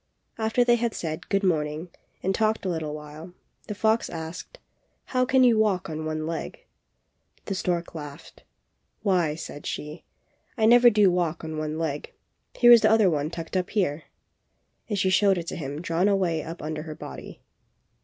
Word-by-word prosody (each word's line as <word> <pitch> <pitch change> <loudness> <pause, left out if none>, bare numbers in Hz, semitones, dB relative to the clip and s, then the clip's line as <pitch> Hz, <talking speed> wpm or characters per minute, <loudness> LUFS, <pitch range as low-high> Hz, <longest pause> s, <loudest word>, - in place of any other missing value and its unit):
After 225 +2 +2
they 240 0 +4
had 235 -1 -1
said 155 -2 -5
"Good 200 0 +1
morning," 155 -1 -1 0.3
and 190 - +1
talked 220 0 0
a - - 0
little 160 -3 -3
while, 155 +3 -10 0.3
the 210 - -4
fox 220 +2 +1
asked, 165 - -7 0.5
"How 255 -1 +1
can 260 +1 +4
you 235 -3 +5
walk 195 -6 +1
on 155 0 -4
one 155 0 -3
leg?" 165 - -5 0.8
The 195 - -3
stork 175 -2 -2
laughed. 150 -1 -10 0.6
"Why," 175 -7 +2
said 150 -2 -8
she, 150 +2 -6 0.5
"I 220 - +3
never 240 +2 +7
do 210 -4 +4
walk 175 -2 -1
on 160 0 -5
one 155 0 -3
leg; 155 -3 -4 0.4
here 240 -1 +6
is 235 -2 +9
the 215 - +4
other 215 -4 +4
one 150 -1 -1
tucked 165 +2 -7
up 185 -1 0
here!" 165 -7 -1 0.8
and 205 - -1
she 190 -1 +2
showed 195 0 +4
it 170 - -4
to - - -5
him 145 -1 -5
drawn 175 +2 +1
way 170 -4 0
up 165 +1 -8
under 155 0 -4
her 155 -1 -7
body. 65 - -9
175 Hz, 180 wpm, -26 LUFS, 155-215 Hz, 0.8 s, is